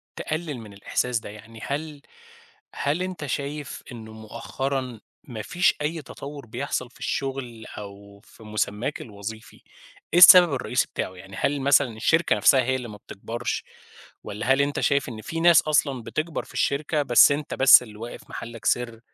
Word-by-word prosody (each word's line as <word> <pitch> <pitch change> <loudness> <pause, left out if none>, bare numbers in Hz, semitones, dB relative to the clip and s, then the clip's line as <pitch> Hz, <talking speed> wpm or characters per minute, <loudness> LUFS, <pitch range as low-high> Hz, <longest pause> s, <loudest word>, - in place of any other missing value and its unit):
تقلّل 155 -5 -4
من 105 -3 -11
الإحساس 115 +4 -1
ده، - - -10
يعني 110 +2 -12
هل 150 0 -5 0.7
هل 150 +5 -1
أنت 180 -5 -5
شايف 145 +1 -5
إنه 110 -2 -10
مؤخرًا 125 +3 -5 0.3
ما 115 -5 -6
فيش 180 - +1
أي 160 +2 -2
تطوُّر 140 0 -9
بيحصَل 125 +2 -4
في - - -21
الشغل 130 -4 -4
أو 100 0 -11
في 110 - -18
مُسمَّاك 110 +6 -3
الوظيفي؟ 110 -3 -9 0.6
إيه 175 - +5
السبب 180 -3 +10
الرئيسي 125 -1 0
بتاعه، - - -3
يعني 95 +2 -12
هل 140 0 0
مثلًا 135 -4 +3
الشركة 160 +9 +2
نَفسها 135 -3 +5
هي 130 +1 0
اللي 125 -2 -5
ما 105 - -10
بتكبَرش 115 +4 -5 0.6
والّا 120 +6 0
هل 135 - +2
أنت 140 0 -1
شايف 140 -2 +1
إن 110 -2 -8
في 165 - -5
ناس 170 -1 +6
أصلًا 140 -5 0
بتكبَر 155 +7 -3
في - - -16
الشركة 150 +2 0
بس 125 +1 +6
أنت 145 +1 -3
بس 135 -1 +7
اللي 105 -3 -13
واقف 115 +2 -9
محلّك 115 -2 -8
سر؟ 120 -2 0
130 Hz, 165 wpm, -24 LUFS, 110-145 Hz, 0.7 s, السبب